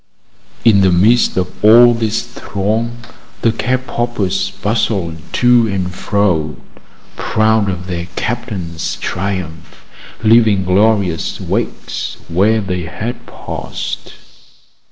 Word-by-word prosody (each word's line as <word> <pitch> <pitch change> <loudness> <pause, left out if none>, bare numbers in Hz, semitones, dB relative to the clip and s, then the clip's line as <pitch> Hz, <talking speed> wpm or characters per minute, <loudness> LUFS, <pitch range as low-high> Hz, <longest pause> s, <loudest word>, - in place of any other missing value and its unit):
In 105 -4 +6
the 95 -1 +4
midst 105 +8 +3
of 90 0 -1
all 120 +3 +8
this 115 -1 -1
throng, 115 0 -3 0.5
the 115 - +4
cap 130 +3 -1
poppers 120 -7 -1
bustled 100 -6 -1 0.2
to 120 -2 +4
and 95 -3 -2
fro, 90 -7 0 0.6
proud 110 -1 +1
of 90 -1 -4
their 85 -2 -4
captain's 105 -9 -3
triumph, 90 -4 -5 0.4
leaving 110 -4 +4
glorious 95 -2 +1
wakes - - -3
where 105 +6 +2
they 90 -3 -3
had 115 +8 -6
passed. - - -6
105 Hz, 105 wpm, -16 LUFS, 90-115 Hz, 0.6 s, all